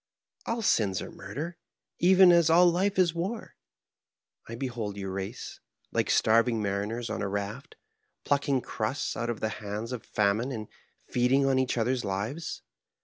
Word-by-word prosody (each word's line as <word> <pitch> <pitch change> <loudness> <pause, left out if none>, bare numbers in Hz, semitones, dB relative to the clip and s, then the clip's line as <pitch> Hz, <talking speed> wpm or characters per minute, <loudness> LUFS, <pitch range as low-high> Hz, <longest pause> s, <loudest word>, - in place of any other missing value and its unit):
" - - -37
All 230 0 -1
sins 100 - +2
are - - -8
murder, 170 +5 -6 0.4
even 185 0 +7
as 170 -2 +5
all 170 +2 +6
life 185 +3 +2
is 180 -3 +4
war. 190 +7 -4 0.9
I 115 - -6
behold 115 -5 -4
your 95 -1 -4
race, 95 0 -6 0.3
like - - 0
starving 115 +1 +3
mariners 105 +3 -2
on - - -3
a 100 - -1
raft, 100 +1 -5 0.5
pluck 145 +1 +1
ing 135 -2 +2
crusts 115 +4 -3
out 120 0 -2
of 115 -4 -3
the 110 - 0
hands 105 +3 -4
of 125 -3 -5
famine 105 +5 0
and 110 -4 -6 0.4
feeding 130 +3 +2
on 135 -1 +3
each 130 -1 0
other's 125 +2 0
lives. 110 - -4
120 Hz, 165 wpm, -28 LUFS, 105-160 Hz, 0.9 s, even